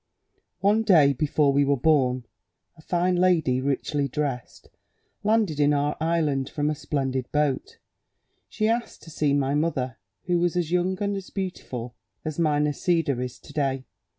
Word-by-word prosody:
"One 205 +3 +3
day, 160 -10 +5
before 145 +1 +2
we 140 +1 +4
were 140 0 +2
born, 130 -3 +2 0.5
a - - -17
fine 180 +2 +1
lady, 165 -8 +2
richly 140 +1 -1
dressed, 135 -3 -4 0.6
landed 210 -8 +1
in 145 0 +4
our 145 +1 0
island 155 -5 0
from 150 0 -1
a - - 0
splendid 135 -3 -3
boat; 150 - -1 0.7
she 215 - 0
asked 230 +1 -2
to 160 - -12
see 150 -1 0
my 140 -1 +1
mother, 135 -7 -1 0.3
who 175 -1 +1
was 175 0 +1
as 170 -2 -1
young 180 +1 +1
and 200 -1 -1
beautiful 130 - -5 0.3
as 155 0 -4
my 155 -3 +2
Nisida 150 -1 +1
is 125 -1 -5
to - - -14
day. 135 -3 -1
150 Hz, 155 wpm, -25 LUFS, 140-175 Hz, 0.7 s, day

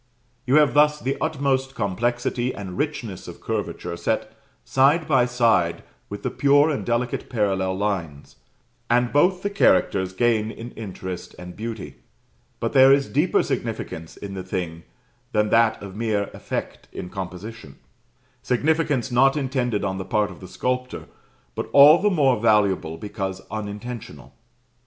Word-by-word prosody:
You 130 - +3
have 150 -2 +5
thus 150 0 +4
the 135 +1 -2
utmost 135 -2 0
complexity 120 +4 -1
and 95 -3 -7
richness 120 - -4
of - - -9
curvature - - -4
set - - -2 0.3
side 145 - +3
by 130 -5 +3
side 110 -9 +2 0.3
with 100 - -7
the - - -1
pure 145 +2 +4
and 145 - -2
delicate 120 +1 -2
parallel 95 -5 0
lines, 85 -8 -3 0.5
and 120 +1 +2
both 180 +5 +3
the 200 - 0
characters 95 - +2
gain 110 0 +1
in 115 +1 -8
interest 95 -4 -7
and 90 0 -9
beauty; 110 - -6 0.6
but - - -2
there 135 0 +7
is 140 0 +4
deeper 150 +6 +2
significance 80 0 -4
in 100 -1 -7
the 95 - -5
thing 85 -3 -5 0.5
than 105 -1 +2
that 115 0 +3
of 100 -1 -9
mere 105 -2 -1
effect - - -5
in - - -6
composition; 95 -2 -8 0.6
significance 145 -1 0
not 135 +4 +4
intended 130 -6 -1
on 95 -1 -2
the - - -3
part 105 +2 0
of - - -12
the 95 - -10
sculptor, 125 +6 -3 0.5
but - - -5
all 145 +4 +8
the 210 - +3
more 140 - +3
valuable 100 -7 +2
because 95 -2 -5
unintentional. 105 - -7
115 Hz, 145 wpm, -23 LUFS, 95-135 Hz, 0.6 s, all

